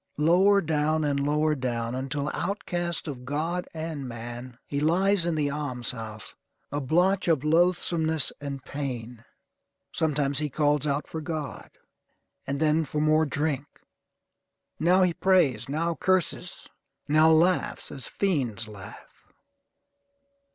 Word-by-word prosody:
Lower 185 +6 +5
down 155 -1 +1
and 145 -1 +1
lower 150 +2 +2
down, 120 -4 -2
until, 140 +3 -2
outcast 175 -4 -2
of 130 -4 -6
God 160 +7 -2
and 160 -4 -5
man, 120 +1 -7
he 140 - -3
lies 175 +4 +3
in 170 - 0
the 145 -2 0
alms 140 -5 -1
house, 110 -3 -8 0.4
a 145 +1 -2
blotch 180 +8 +2
of 155 -5 +2
loathsomeness 160 -1 +2
and 140 -2 -6
pain. 125 -5 -5 0.7
Sometimes 145 -3 +1
he 150 -1 -1
calls 150 +1 +1
out 140 +1 0
for 160 - -6
God; 155 -2 -5 0.8
and 140 +1 -2
then 155 +1 +3
for 150 0 -3
more 155 +1 +3
drink. 145 -1 -1 1.1
Now 180 +3 +4
he 180 -2 +2
prays; 165 - +2
now 165 +4 0
curses. 185 +1 -1 0.4
Now 155 +2 +5
laughs 175 +3 +2
as 135 -4 -6
fiends 125 - -1
laugh. 100 -3 -12
150 Hz, 130 wpm, -27 LUFS, 135-165 Hz, 1.1 s, Lower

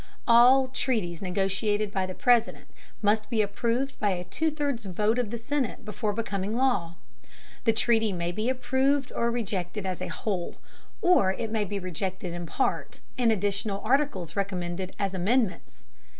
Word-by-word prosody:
All 250 +3 +7
treaties 215 -11 -1
negotiated 195 +2 0
by 190 -2 -1
the 185 - -6
President 245 -4 +2 0.4
must 210 +1 +2
be 220 -2 +2
approved 235 +6 -1
by 205 - +2
a 180 -2 -1
two 315 - -1
thirds 285 -6 -2
vote 210 +5 +1
of 240 -4 -1
the 235 - -3
Senate 255 -1 -2
before 210 0 -2
becoming 205 -1 -2
law. 200 -11 +1 0.7
The 225 - +5
treaty 225 -1 +2
may 175 -2 -2
be 215 +6 -1
approved 265 +1 +1
or 235 - 0
rejected 205 -4 -3
as 185 -2 -3
a - - -2
whole, 190 -5 -3 0.5
or 340 - +5
it 220 +2 -4
may 220 -2 0
be 205 +1 -4
rejected 185 -1 -4
in 175 -1 -5
part, 265 - -1 0.2
and 240 -2 +3
additional 200 0 -1
articles 220 - +1
recommended 185 -2 -3
as 195 -1 -1
amendments. 195 +2 -1
210 Hz, 160 wpm, -27 LUFS, 190-240 Hz, 0.7 s, All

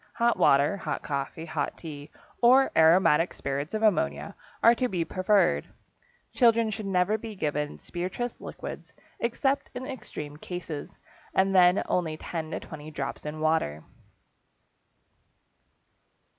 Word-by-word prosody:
Hot 235 0 +2
water, 140 +8 +4
hot - - -4
coffee, 140 +3 -4
hot 155 -3 -3
tea, 145 -3 -9 0.3
or 260 +3 +6
aromatic 165 0 +5
spirits 140 +7 -3
of 215 - -2
ammonia 70 - +1 0.3
are 230 - +8
to 250 +1 0
be 180 -6 -2
preferred. 185 0 +2 0.7
Children 230 -2 +4
should 215 -1 -5
never 195 +3 +1
be 220 -1 -7
given 150 -4 -2
spirituous 185 +8 -5
liquids, - - -8 0.3
except 270 +4 0
in 250 +1 -5
extreme 150 - -7
cases, 165 -3 -6 0.5
and 195 0 +3
then 180 0 +5
only 160 -3 -1
10 160 -1 -5
to - - -3
20 155 -1 -9
drops 140 0 -5
in 155 +1 -5
water. 155 - 0
175 Hz, 130 wpm, -27 LUFS, 150-215 Hz, 0.7 s, are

